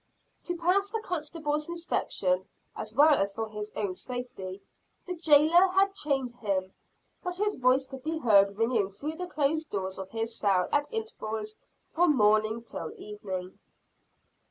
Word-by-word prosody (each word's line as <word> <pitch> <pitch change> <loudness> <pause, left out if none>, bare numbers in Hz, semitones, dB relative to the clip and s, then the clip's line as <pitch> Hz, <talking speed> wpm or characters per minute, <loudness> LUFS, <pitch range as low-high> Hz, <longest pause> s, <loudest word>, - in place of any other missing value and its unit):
To 350 0 -2
pass 370 +4 +2
the 450 +2 -2
constable's 305 -4 -3
inspection, 190 - 0 0.3
as 215 - -5
well 295 +3 +7
as 200 -6 +1
for 225 0 -2
his 210 0 -6
own 200 -3 -1
safety, 200 -4 -6 0.4
the 360 - -3
jailer 325 +2 +5
had 390 +1 +2
chained 275 -9 -1
him; 190 -4 -2 0.5
but 360 -1 -3
his 415 +1 +1
voice 255 +1 +3
could 265 0 -9
be 320 +4 -2
heard 200 -7 +4
ringing 225 -3 +1
through 295 +11 -6
the 360 0 -4
closed 310 -1 0
door 190 -2 -2
of 190 0 -6
his 225 +1 -1
cell 190 -4 +2
at 290 0 +1
intervals 220 - -4 0.3
from 325 -4 +2
morning 215 +1 +3
till - - -6
evening. 190 -3 -6
255 Hz, 155 wpm, -29 LUFS, 210-325 Hz, 0.5 s, well